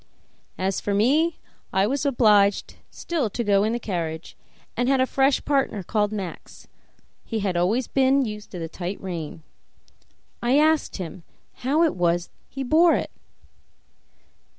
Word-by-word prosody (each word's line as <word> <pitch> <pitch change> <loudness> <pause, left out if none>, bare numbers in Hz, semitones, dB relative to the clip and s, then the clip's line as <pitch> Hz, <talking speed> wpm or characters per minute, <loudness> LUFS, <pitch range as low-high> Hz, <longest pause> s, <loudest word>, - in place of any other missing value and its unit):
As 190 +1 -1
for 205 - -1
me, 300 +10 +2 0.3
I 190 +1 +2
was 280 +6 -1
obliged 210 -6 +3 0.2
still 310 -10 -2
to 235 +4 -3
go 200 -2 +3
in 215 - +1
the 235 - -1
carriage, 170 -6 -4 0.4
and 245 +2 0
had 270 -1 +3
a 260 - +4
fresh 270 +1 +1
partner 270 -8 0
called 210 +2 0
Max; 195 -5 -7 0.6
he 220 -1 -3
had 190 -3 -1
always 205 +9 +1
been 270 0 +3
used 210 -1 -7
to 185 - -8
the 165 -1 -4
tight 175 +4 -5
rein. 165 -4 -6 1.0
I 245 +3 +3
asked 310 +1 +2
him 180 -1 -7 0.4
how 280 +6 +1
it 325 - +2
was 175 -1 0 0.2
he 270 - -5
bore 325 +6 +4
it. - - -3
215 Hz, 150 wpm, -24 LUFS, 190-270 Hz, 1.0 s, a